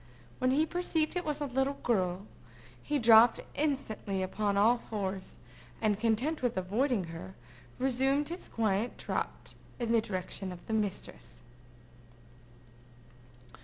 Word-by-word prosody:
When 255 Hz, -, +2 dB
he 290 Hz, +4 st, +3 dB
perceived 325 Hz, -2 st, -1 dB
it 360 Hz, -, -1 dB
was 300 Hz, -2 st, -3 dB
a -, -, 0 dB
little 270 Hz, +1 st, 0 dB
girl, 190 Hz, -6 st, 0 dB, 0.6 s
he 295 Hz, -, 0 dB
dropped 225 Hz, -1 st, +7 dB
instantly 220 Hz, -9 st, -1 dB
upon 200 Hz, +2 st, -1 dB
all 230 Hz, +4 st, +5 dB
fours, 195 Hz, -4 st, -5 dB, 0.4 s
and 210 Hz, -2 st, +1 dB
content 235 Hz, +8 st, +1 dB
with 245 Hz, -5 st, 0 dB
avoiding 210 Hz, +4 st, +1 dB
her, 185 Hz, +3 st, -8 dB, 0.4 s
resumed 270 Hz, +3 st, +1 dB
his 345 Hz, +2 st, -6 dB
quiet 220 Hz, 0 st, 0 dB
trot -, -, -4 dB, 0.2 s
in 235 Hz, -2 st, -2 dB
the 230 Hz, -1 st, +4 dB
direction 185 Hz, -2 st, -3 dB
of 175 Hz, -1 st, -9 dB
his 220 Hz, -, 0 dB
mistress. 210 Hz, -3 st, -4 dB
230 Hz, 130 wpm, -31 LUFS, 200-270 Hz, 0.6 s, dropped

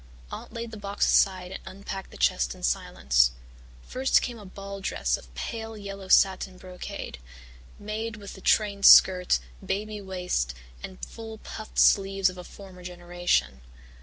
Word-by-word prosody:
Aunt -, -, -8 dB
laid 230 Hz, 0 st, -6 dB
the 220 Hz, -, -8 dB
box 200 Hz, 0 st, -1 dB
aside 185 Hz, -2 st, +3 dB
and 190 Hz, -, -6 dB
unpacked 195 Hz, 0 st, -7 dB
the -, -, -13 dB
chest 60 Hz, 0 st, +1 dB
in -, -, -14 dB
silence. 60 Hz, 0 st, +2 dB, 0.5 s
First 265 Hz, +1 st, +2 dB
came 240 Hz, -2 st, -4 dB
a 205 Hz, -, -11 dB
ball 200 Hz, +1 st, -8 dB
dress -, -, 0 dB
of -, -, -12 dB
pale 225 Hz, -1 st, -5 dB
yellow 195 Hz, -1 st, -8 dB
satin 190 Hz, -1 st, +3 dB
brocade, 180 Hz, -, -8 dB, 0.6 s
made 220 Hz, +2 st, -4 dB
with 200 Hz, -2 st, -9 dB
the 190 Hz, -, -12 dB
trained 200 Hz, -1 st, +3 dB
skirt, 180 Hz, -1 st, +7 dB, 0.3 s
"baby" 205 Hz, +2 st, -3 dB
waist 180 Hz, -, -2 dB, 0.3 s
and 185 Hz, -, -8 dB
full 225 Hz, -1 st, -9 dB
puffed 215 Hz, 0 st, -9 dB
sleeves 195 Hz, -1 st, +4 dB
of 180 Hz, -, -11 dB
a -, -, -7 dB
former 190 Hz, -1 st, -12 dB
generation. 175 Hz, -, -1 dB
195 Hz, 155 wpm, -27 LUFS, 180-210 Hz, 0.6 s, skirt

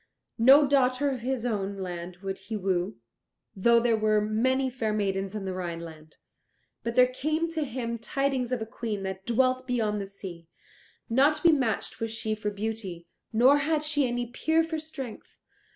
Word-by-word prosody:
No 270 Hz, +5 st, +8 dB
daughter 270 Hz, 0 st, +2 dB
of 260 Hz, -, -3 dB
his 250 Hz, 0 st, -2 dB
own 200 Hz, -4 st, -2 dB
land 175 Hz, -1 st, -6 dB
would 195 Hz, 0 st, -4 dB
he 220 Hz, -, -5 dB
woo, 185 Hz, -, -1 dB, 0.6 s
though 235 Hz, +5 st, +5 dB
there 235 Hz, -1 st, +2 dB
were 215 Hz, -1 st, +2 dB
many 250 Hz, +6 st, +1 dB
fair 235 Hz, -4 st, -2 dB
maidens 195 Hz, -1 st, -1 dB
in 205 Hz, -2 st, -4 dB
the 190 Hz, -, -3 dB
Rhineland. 165 Hz, -3 st, -7 dB, 0.6 s
But 235 Hz, 0 st, -3 dB
there 250 Hz, -, +7 dB
came 310 Hz, +6 st, -1 dB
to 320 Hz, -2 st, -1 dB
him 235 Hz, -3 st, -4 dB
tidings 265 Hz, 0 st, -1 dB
of 245 Hz, -3 st, -1 dB
a -, -, -5 dB
Queen 220 Hz, -3 st, -4 dB
that 190 Hz, 0 st, -5 dB
dwelt 255 Hz, +2 st, +2 dB
beyond 215 Hz, -4 st, 0 dB
the 195 Hz, -, -5 dB
sea; 185 Hz, -4 st, -9 dB, 0.6 s
not 270 Hz, +6 st, +4 dB
to -, -, -7 dB
be 340 Hz, -, +7 dB
matched 260 Hz, -8 st, -1 dB
was 225 Hz, -, -1 dB
she 220 Hz, -1 st, -2 dB
for 215 Hz, -1 st, -2 dB
beauty, 200 Hz, -4 st, -5 dB, 0.3 s
nor 255 Hz, +6 st, +5 dB
had 300 Hz, +1 st, 0 dB
she 295 Hz, -3 st, +1 dB
any 245 Hz, 0 st, -2 dB
peer 320 Hz, +7 st, +1 dB
for 320 Hz, -1 st, -3 dB
strength. 275 Hz, -7 st, -8 dB
230 Hz, 180 wpm, -28 LUFS, 200-260 Hz, 0.6 s, No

